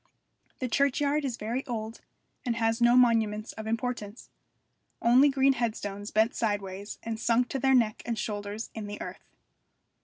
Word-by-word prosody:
The 255 - -2
churchyard 280 +3 +1
is 255 -4 -2
very 235 +5 -3
old, 225 -2 -5 0.4
and 240 -4 -1
has 225 0 0
no 240 +1 +6
monuments 225 -3 +3
of 220 0 -8
importance: 225 -1 -4 0.7
only 255 +5 +5
green 270 0 +3
headstones 210 -4 -3
bent 220 +2 +2
sideways 200 -2 -3
and 225 -1 -4
sunk 240 +1 +2
to 270 - -2
their 265 +1 +4
neck 225 -4 +2
and 235 -1 -3
shoulders 205 +1 -4
in 215 -2 -6
the 205 0 -6
earth. - - -8
230 Hz, 155 wpm, -28 LUFS, 215-250 Hz, 0.7 s, no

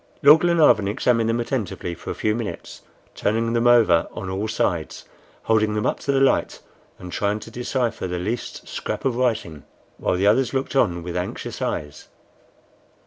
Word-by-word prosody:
Lord 150 +3 +8
Glenarvan 165 - +4
examined 115 +1 +1
them 115 +1 0
attentively 115 -7 -3
for - - -9
a - - -3
few 105 - 0
minutes, 115 -1 -6 0.3
turning 115 +2 0
them 120 +1 +2
over 110 -9 +5
on 95 - -5
all 100 +3 -2
sides, 85 -7 -2 0.4
holding 110 -1 +2
them 105 - -1
up - - 0
to 140 - -1
the 135 - +2
light, 135 0 +2 0.4
and 90 -1 -9
trying 105 +3 -1
to 115 - -10
decipher 120 -3 -2
the 90 0 -3
least 110 +7 -4
scrap - - -5
of 130 -3 +1
writing, 110 - -1 0.4
while - - 0
the 95 +2 0
others 125 +6 +3
looked 135 +1 -2
on 85 -10 +2
with 85 0 -6
anxious 90 0 -4
eyes. 75 -1 -4
110 Hz, 175 wpm, -22 LUFS, 95-125 Hz, 0.4 s, Lord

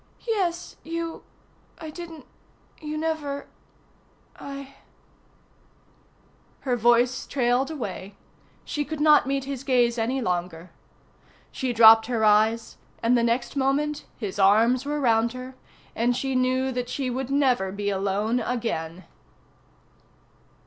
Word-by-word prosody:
"Yes, 365 -6 -2
you 330 0 -5 0.6
I 315 -2 -8
didn't 330 -1 -9 0.6
you 305 0 -4
never 305 -3 -3 0.9
I 275 -1 -9 0.8
" - - -35
Her 255 -3 0
voice 240 +2 +2
trailed 255 0 +1
away; 205 -9 -6 0.5
she 295 - -2
could 310 +1 -6
not 300 -3 +5
meet 275 0 -1
his 275 -1 -5
gaze 245 -3 +2
any 250 +4 0
longer; 175 -4 -3 0.8
she 260 -1 -2
dropped 225 -1 +7
her 230 -3 0
eyes, 220 +2 +2 0.3
and 235 +2 +4
the 240 - +3
next 235 +3 0
moment 285 +2 0
his 205 -3 -5
arms 225 +6 +4
were 295 0 -1
round 230 -3 +2
her, 255 +1 -8 0.4
and 240 +2 +1
she 270 -1 -2
knew 255 +1 +1
that 245 -1 -3
she 265 -3 -2
would 260 +1 -3
never 255 -9 +2
be 205 +1 -2
alone 200 +4 0
again. 185 -8 -3
250 Hz, 125 wpm, -25 LUFS, 225-280 Hz, 0.9 s, dropped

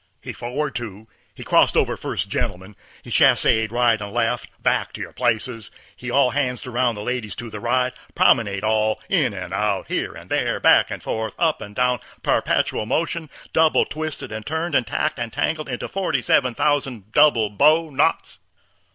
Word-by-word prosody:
He - - -6
for'ard 125 +5 -3
two'd, 110 -3 -6 0.3
he - - -9
crost - - +3
over - - +2
first - - -3
gentleman, 95 +3 -4 0.3
he - - -11
chassade 110 -1 +4
right 120 -2 +2
and 100 0 -6
left, 120 +1 -1
back - - +1
to - - -7
your - - -7
places, 120 -2 -1 0.3
he 125 - -7
all 125 0 +3
hands'd 125 -3 -1
aroun', 125 -1 0
ladies 105 0 -4
to 115 -1 -7
the 105 - -6
right, 125 +2 0 0.2
promenade 100 -5 +3
all, 110 0 +1
in 155 - +2
and 95 -2 -7
out, 100 -1 -1
here - - -2
and - - -13
there, - - 0
back - - +5
and - - -6
forth, 110 -1 -3
up 160 -2 +1
and 105 0 -9
down, 125 0 +1 0.2
perpetual 105 - 0
motion, 165 +3 -1 0.2
double 160 -1 +4
twisted 150 -3 -5
and 110 0 -5
turned 160 +2 -2
and 125 -5 +2
tacked 120 - -1
and 120 -1 -4
tangled 155 +2 -2
into 125 - -4
forty 160 -10 -1
eleven 125 -3 +3
thousand 130 -8 -1
double 120 -7 +4
bow 155 +9 +3
knots. 135 - 0
120 Hz, 175 wpm, -22 LUFS, 110-145 Hz, 0.3 s, back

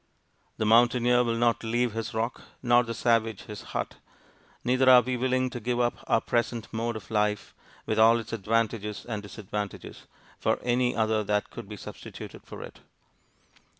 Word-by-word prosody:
The 110 - 0
mountaineer 120 +2 +4
will 115 -1 0
not 120 0 +1
leave 120 0 0
his 115 0 -3
rock, 115 +2 -2 0.2
nor 120 0 +5
the 115 -1 -4
savage 115 -2 +1
his 105 -1 -8 0.2
hut; - - -4 0.7
neither 130 +1 +3
are 125 -1 +8
we 125 +2 -1
willing 130 0 0
to 120 - -5
give 120 +2 -1
up 120 0 0
our - - +4
present 120 -1 -1
mode 115 +1 -2
of 110 -1 -9
life, 105 -1 0 0.3
with - - 0
all 115 +1 +7
its 115 -1 -6
advantages 110 0 -1
and 105 -4 -4
disadvantages, 105 0 -6 0.3
for - - +1
any 125 0 +1
other 110 -1 +1
that 105 0 0
could 100 - -9
be 105 - -7
substituted - - -9
for - - -8
it. - - -11
115 Hz, 170 wpm, -27 LUFS, 110-120 Hz, 0.7 s, are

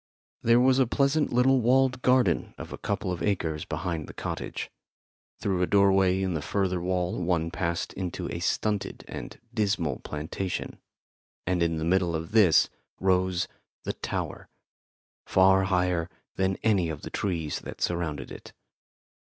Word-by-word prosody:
There 115 +1 +5
was 130 +1 +4
a 130 - +4
pleasant 140 +5 +2
little 125 +2 +4
walled 130 +2 +3
garden 125 -10 +2
of - - -8
a - - -5
couple 90 - -2
of 90 - -4
acres 80 -7 -1
behind 80 0 -3
the - - -11
cottage. - - -5 0.7
Through 95 -3 0
a 90 - +2
doorway 95 -1 +4
in 95 -1 0
the 80 - -2
further 95 +1 -1
wall 90 0 -1
one 85 -2 0
passed 85 -2 -2
into 90 -2 -4
a - - -4
stunted 105 -2 -1
and - - -7
dismal 100 - 0
plantation, 80 +5 -4 0.7
and 90 0 0
in 85 -1 +1
the 80 - -2
middle 90 -1 +2
of 80 +1 -4
this 105 -7 +6 0.3
rose 95 -1 +1 0.4
the - - -2
tower, - - -4 0.8
far 95 0 +5
higher 90 -3 +1 0.3
than 95 0 +1
any 100 -7 +3
of 80 - -6
the - - -7
trees 85 -7 -2
that - - -9
surrounded 80 -6 -2
it. - - -10
95 Hz, 155 wpm, -27 LUFS, 85-105 Hz, 0.8 s, this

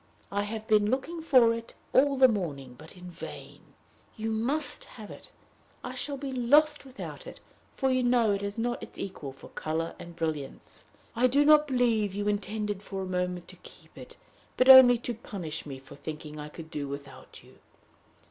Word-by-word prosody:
I 200 0 0
have 220 +1 -5
been 210 -1 +4
looking 275 +7 -2
for 255 -7 +5
it 230 0 -8 0.2
all 275 +1 +4
the 260 0 +8
morning, 150 - -3
but 155 +7 -13
in 180 0 -10
vain. - - -10 0.6
You 220 +1 -2
must 265 +8 -1
have 215 -3 -11
it. - - -12 0.5
I 250 - -5
shall 280 +2 -4
be 275 0 -5
lost 290 +5 +3
without 265 0 -9
it, - - -10 0.4
for 265 -1 +1
you 255 0 +2
know 240 -3 +3
it 200 0 -1
has 200 +1 -4
not 240 +1 -2
its - - -10
equal 155 -8 -6
for 135 - -14
color 160 +1 -3
and 170 0 -10
brilliance. 155 -4 -5 0.3
I 245 +2 +4
do 280 +4 +3
not 300 0 +6
believe 230 -6 +1
you 205 0 -2
intended 210 0 -2
for 195 -2 -5
a - - -4
moment 180 -1 -3
to - - -12
keep - - -16
it, - - -12 0.4
but 255 - +3
only 260 -2 +10
to 240 +1 -4
punish 175 -9 -6
me 135 -2 -6
for 135 +1 -14
thinking 150 0 -8
I 150 0 -7
could 160 +1 -11
do 145 -1 -4
without 140 -1 -10
you. - - -20
210 Hz, 190 wpm, -28 LUFS, 170-255 Hz, 0.6 s, only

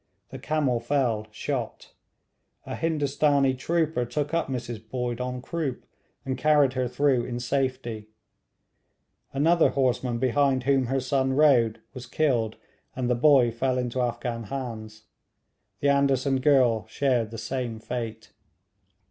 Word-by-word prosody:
The - - -7
camel 145 -6 0
fell, 120 -4 0
shot. 120 +2 -5 0.7
A - - -5
Hindustanee 145 -3 +1
trooper 160 -1 0
took 145 +6 -3
up 170 -1 +1
Mrs 120 -4 -5
Boyd 125 -1 -3
en 125 0 -4
croupe, 155 -6 -4 0.4
and 130 -1 -3
carried 145 -1 +4
her 130 -1 -1
through 125 0 +1
in 120 -1 -4
safety; 125 -4 -2 1.2
another 160 +5 +3
horseman 125 -2 0
behind 130 +1 +1
whom 135 -1 +2
her 135 +2 0
son 130 0 0
rode, 120 -6 +3
was 125 -2 -9
killed, 120 -6 0 0.4
and 125 -1 -1
the - - +5
boy 125 -1 +4
fell 130 +3 -1
into 125 0 -1
Afghan 120 -1 -3
hands. 110 -3 -6 0.8
The 140 - +3
Anderson 140 -1 +2
girl 130 -5 +3
shared 125 -6 0
the 115 - -8
same 125 -2 -4
fate. 115 -1 -6
130 Hz, 130 wpm, -26 LUFS, 120-140 Hz, 1.2 s, the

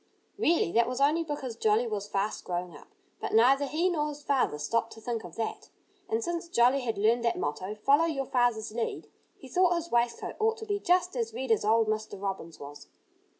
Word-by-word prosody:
Really, 335 - +2
that 235 +3 +3
was 250 +1 -3
only 300 +4 +3
because 290 -6 -5
Jolly 220 +1 +2
was 210 -3 -3
fast 200 +1 -2
growing 175 -2 -4
up. - - -14 0.3
But - - -2
neither 270 +5 +5
he 325 +6 +1
nor 310 -5 0
his 295 0 -9
father 265 - +1
stopped 230 +10 -1
to - - -12
think 230 0 -4
of 175 -2 -10
that. 225 - -4 0.4
And 445 +2 0
since 340 -2 -3
Jolly 250 -1 +4
had 230 -4 -2
learned 225 +4 +2
that 235 - +1
motto, 185 +8 -3
"Follow 280 +9 +3
your 285 -5 -2
father's 245 -4 +1
lead," 230 +1 -4 0.3
he 265 - -12
thought 355 +5 +3
his 340 0 -4
waistcoat 235 0 0
ought 445 +1 +2
to 445 - -7
be 410 -1 -1
just 360 -4 +2
as 230 -2 -2
red 260 0 -3
as 225 - +3
old 220 +1 +3
Mr. 215 -2 -3
Robin's 190 -5 -5
was. 145 0 -10
235 Hz, 210 wpm, -29 LUFS, 215-295 Hz, 0.4 s, neither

